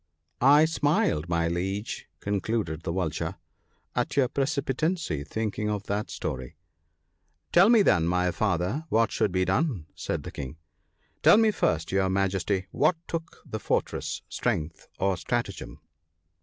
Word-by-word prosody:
I 145 +4 +7
smiled, 145 - +1
my 85 -1 +1
Liege," 95 +5 -3
concluded 100 -5 -1
the 85 - -3
Vulture, 85 -4 -2 0.3
" - - -43
at - - -1
your 130 -3 +4
precipitancy, 140 - -1
thinking 105 +5 -2
of 105 -1 -2
that 100 +2 -2
story." 65 -1 -5 0.5
" - - -47
Tell 185 +5 +7
me, 230 -3 +6
then, 85 - +3
my 90 +1 +2
Father, 100 - -1
what 115 +1 +3
should 105 - +1
be 95 0 +1
done," 95 - 0
said - - -3
the - - -7
King. 70 +2 -7 0.6
"Tell - - +7
me 220 -1 +5
first, 80 - 0
your 95 0 +2
Majesty, 95 0 0
what 155 +4 +3
took 165 0 -5
the 110 - -5
fortress, - - -2
strength 80 +1 -2
or 95 -1 +1
stratagem 80 - -3
100 Hz, 145 wpm, -27 LUFS, 85-140 Hz, 0.6 s, I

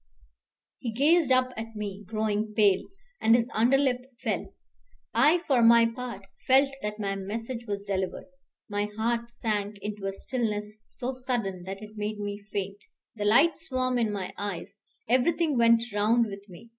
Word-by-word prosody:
He 235 - -3
gazed 295 +6 +3
up 255 0 +4
at 225 0 -7
me, 205 -1 -5
growing 215 -1 -1
pale, 200 -3 +4 0.3
and 225 +1 +6
his 235 -1 +2
underlip 250 +2 +3 0.2
fell. - - -2 0.6
I, 300 +9 +4
for 260 -4 +3
my 230 0 +7
part, 230 -4 -5 0.2
felt 270 +2 +5
that 210 0 -4
my 195 -1 -1
message 230 +5 -5
was 200 -1 -3
delivered. 190 -2 -2 0.4
My 205 -1 -1
heart 235 +1 -1
sank 210 -3 -2
into 205 -1 -5
a 195 - -2
stillness 210 -2 -3
so 255 +1 -4
sudden 235 -8 -3
that 195 +2 -6
it 215 0 -11
made 210 0 -3
me 205 0 -4
faint. 200 0 -3 0.3
The 210 -2 -3
light 280 +12 +5
swam 255 -5 0
in 225 -3 +1
my 195 -3 -4
eyes; 200 0 -5 0.3
everything 300 +6 +2
went 230 -1 +5
round 220 +3 +3
with 200 -1 -9
me. 185 +6 -13
220 Hz, 160 wpm, -28 LUFS, 205-245 Hz, 0.6 s, my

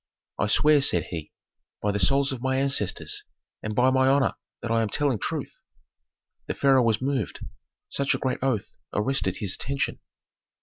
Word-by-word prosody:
"I - - +1
swear," 150 +6 +5
said 90 - +4
he, 80 -3 -7 0.5
"by 105 - 0
the 100 - -2
souls 135 +8 +3
of 130 -3 -5
my 130 0 0
ancestors, 135 -7 0 0.4
and 110 0 -4
by 125 +3 +4
my 130 0 +3
honor 135 0 +3 0.3
that 120 - -3
I 115 0 +3
am 110 - -1
telling 140 -2 +1
truth." - - -4 0.9
The - - -3
pharaoh 135 -2 +4
was 115 0 +1
moved; 135 -1 -2 0.4
such 140 0 0
a - - -1
great 130 - -2
oath 125 -7 -2 0.2
arrested 105 -4 +1
his 100 -3 -2
attention. 140 0 -2
130 Hz, 170 wpm, -26 LUFS, 105-135 Hz, 0.9 s, swear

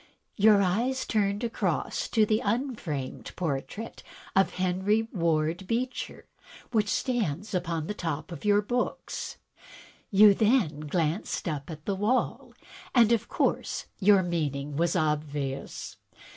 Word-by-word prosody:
Your 210 -1 +6
eyes 235 +8 0
turned 205 0 0
across 230 -1 -1
to 220 -2 +3
the 215 +2 +1
un 245 +6 0
framed 145 -10 -5
portrait 175 +7 -4 0.3
of 195 0 +3
Henry 190 +4 +1
Ward 165 0 0
Beecher 250 +4 -3 0.5
which 215 -3 +2
stands 210 - -1
upon 170 -3 -1
the 210 - -3
top 160 -5 -4
of 170 - -8
your 205 0 +4
books. 245 +4 -3 0.7
You 205 0 +7
then 210 - +2
glanced 160 +6 -1
up 150 -2 -3
at 155 -2 -8
the 200 - 0
wall, 210 +7 -1 0.4
and 235 -2 +6
of 235 - +2
course - - 0
your 200 -1 +5
meaning 150 -5 -2
was 170 +3 +1
obvious. 150 -3 -2
190 Hz, 130 wpm, -28 LUFS, 155-215 Hz, 0.7 s, You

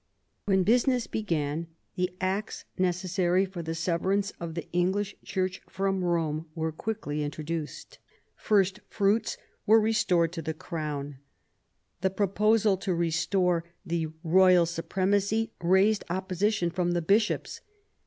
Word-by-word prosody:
When 190 -2 +3
business 245 +3 +3
began, 165 -6 -2 0.3
the 180 0 0
Acts 195 +3 -2
necessary 185 0 +1
for 185 -2 -7
the 165 0 -4
severance 185 +4 0
of 165 -2 -5
the 170 - -5
English 190 +4 0
Church 185 -1 -2
from 195 -1 -1
Rome 165 -2 0
were 160 -1 -1
quickly 155 -4 -4
introduced. 155 - -5 0.4
First 200 -1 +2
fruits 210 +2 +1 0.3
were 220 +2 +7
restored 185 -6 +2
to 165 - -4
the 160 0 -4
Crown. 150 -5 -5 0.8
The 190 - +2
proposal 205 +1 +2
to 185 -1 -2
restore 170 +1 +1 0.2
the 165 -1 -1 0.2
royal 180 +1 +5
supremacy 200 +6 0
raised 190 +5 +3
opposition 190 +1 0
from 175 -1 0
the 175 -1 0
Bishops. 210 +6 +1
185 Hz, 125 wpm, -28 LUFS, 165-200 Hz, 0.8 s, were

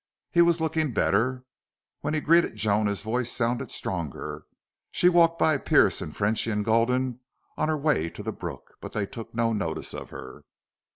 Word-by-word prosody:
He 170 - +5
was 170 0 +4
looking 160 -4 0
better. 130 +2 +1 0.5
When 155 - -2
he 155 - 0
greeted 170 -5 +3
Joan 105 0 +1
his 100 -1 -2
voice 120 +2 -1
sounded 120 0 -1
stronger. 85 -7 -4 0.5
She 180 - +4
walked 165 -1 +4
by 155 -4 +3
Pearce - - +3
and 75 - -7
Frenchy 110 +2 +1
and 105 -1 -1
Gulden 125 +2 +1 0.4
on 155 - 0
her 155 - +1
way 145 - +1
to - - -9
the - - -3
brook, - - -8
but - - -8
they 105 - -1
took 115 +3 -9
no 115 -1 +1
notice 90 -7 -3
of - - -7
her. 65 -1 -10
120 Hz, 180 wpm, -26 LUFS, 105-155 Hz, 0.5 s, He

